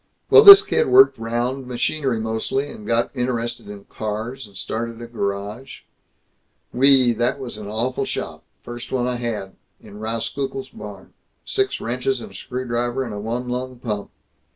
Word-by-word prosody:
Well, - - +10
this 400 0 +12
kid 465 +3 +1
worked 395 +1 +6
'round, 120 +3 -2
machinery 125 0 -1
mostly, 110 +5 -2
and 105 - -11
got 115 +3 0
interested 120 -3 -2
in 100 -1 -9
cars, 110 +5 -5
and 100 -2 -14
started 115 +3 -4
a 120 - -7
garage 105 +2 -5 0.9
Wee, 130 -1 +5
that 120 +4 0
was 125 -5 -7
an 105 - -8
awful 115 +5 -2
shop, - - -5 0.2
first 120 0 -8
one 125 -2 0
I 125 -1 -1
had! 110 -5 -5 0.2
In 105 - -13
Rauskukle's 130 +4 -4
barn. 100 -2 -11 0.3
Six 395 0 -1
wrenches 400 0 -2
and 220 - -9
a - - -16
screwdriver 120 0 -3
and 115 -4 -6
a 105 - -5
one 120 +4 -4
lung 125 +1 -4
pump! 105 -4 -4
120 Hz, 160 wpm, -21 LUFS, 110-130 Hz, 0.9 s, this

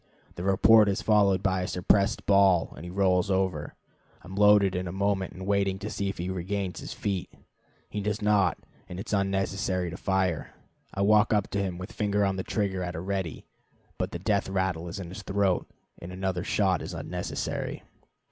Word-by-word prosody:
The - - -8
report 105 +3 +5
is 100 - -1
followed 100 -3 +3
by 95 -1 +1
a 90 - -2
suppressed 100 +2 +1
bawl, 100 -4 +4
and 75 - -10
he 90 - -7
rolls 90 0 +2
over. 95 -6 -1 0.5
I - - -15
am 90 - -9
loaded 105 -1 +5
in 90 0 -2
a - - -4
moment 95 0 -1
and 95 +1 -8
waiting 100 -1 +1
to 100 +2 -6
see 100 -1 -2
if 100 - -5
he 85 - -3
regains 95 +1 -3
his - - -7
feet. 95 -3 -3 0.6
He 105 - -4
does 105 +1 -1
not, 105 -4 +2 0.3
and 90 - -6
it 105 - -7
is - - -3
unnecessary 95 -2 0
to 90 - -7
fire. 95 -5 -1 0.4
I 100 - -3
walk 105 +1 +4
up 105 -1 0
to 100 - 0
him 95 -3 -3
with 90 +4 -7
finger 105 -1 +1
on 95 -1 0
trigger 95 0 -1
at 90 0 -4
a - - -3
ready, 95 -4 -3 0.5
but - - -1
the - - -5
death 100 +2 0
rattle 95 -3 -1
is 85 - -6
in 90 -3 -6
his 95 - -8
throat, 100 -2 0 0.3
and 85 - -7
another 95 -1 -2
shot 95 -4 +1
is - - -6
unnecessary. - - -4
95 Hz, 200 wpm, -27 LUFS, 90-100 Hz, 0.6 s, report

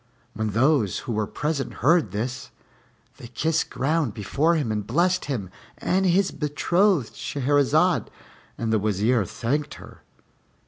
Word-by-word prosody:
When 110 0 -2
those 120 - +2
who - - -3
were 105 -2 -1
present 150 -3 -3
heard 165 +5 +3
this, 120 +5 -4 0.7
they - - -10
kissed 160 +6 -1
ground 140 -1 -1
before 140 - +1
him 145 -8 -1
and 105 -1 -3
blessed 175 +8 +1
him 110 -10 -4 0.3
and 190 +1 +1
his 185 +2 +2
betrothed 160 - +1
Shahrazad, 145 +5 +1 0.5
and 115 -1 -1
the 110 - +3
Wazir 105 +2 +1
thanked 140 - -2
her. - - -13
140 Hz, 135 wpm, -24 LUFS, 110-160 Hz, 0.7 s, heard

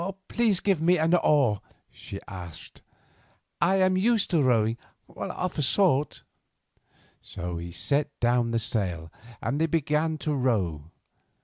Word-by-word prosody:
"Please 225 -6 +2
give 195 -6 +1
me 175 +2 +4
an 160 +2 +2
oar," 140 - +3 0.3
she 100 - -8
said. 90 -5 -9 0.8
"I 185 +3 +3
am 185 -1 +3
used 215 +2 +2
to 165 -4 +3
rowing—of 120 +8 -2
a - - +2
sort." 150 -1 +2 1.0
So 90 -3 -6
he 85 +1 -6 0.2
let 145 0 0
down 120 0 +2
the 115 - 0
sail, 90 -8 -2 0.3
and 145 +3 -1
they 165 - +3
began 155 0 0
to 150 +1 -2
row. 100 - 0
140 Hz, 130 wpm, -26 LUFS, 105-170 Hz, 1.0 s, me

